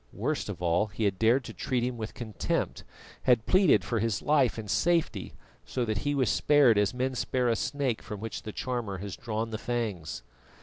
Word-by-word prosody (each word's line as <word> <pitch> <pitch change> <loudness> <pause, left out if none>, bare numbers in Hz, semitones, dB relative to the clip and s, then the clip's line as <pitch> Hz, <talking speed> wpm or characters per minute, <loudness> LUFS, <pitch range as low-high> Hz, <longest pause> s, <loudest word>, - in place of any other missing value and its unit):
Worst - - -2
of - - -6
all, 85 +5 +2
he 105 +2 -4
had 95 -3 +1
dared 120 +4 +4
to - - -8
treat 125 -2 -1
him 125 0 -1
with 110 -2 -6
contempt; 110 - -2 0.4
had 120 -3 +3
pleaded 185 -3 +5
for 115 - 0
his 110 -1 -1
life 140 -6 +3
and 110 -2 -5
safety, 160 - 0 0.3
so 125 -2 -2
that 110 -1 -1
he 145 0 -1
was 130 -3 +2
spared 140 -8 +5
as 105 - +2
men 130 +1 -1
spare 125 0 0
a 115 - +3
snake 135 -1 -1
from 105 - -7
which 110 +1 -5
the 110 - -6
charmer 120 -5 -3
has 100 +1 -6
drawn 115 -3 -3
the 110 - -3
fangs. 105 - -3
115 Hz, 205 wpm, -29 LUFS, 105-130 Hz, 0.4 s, pleaded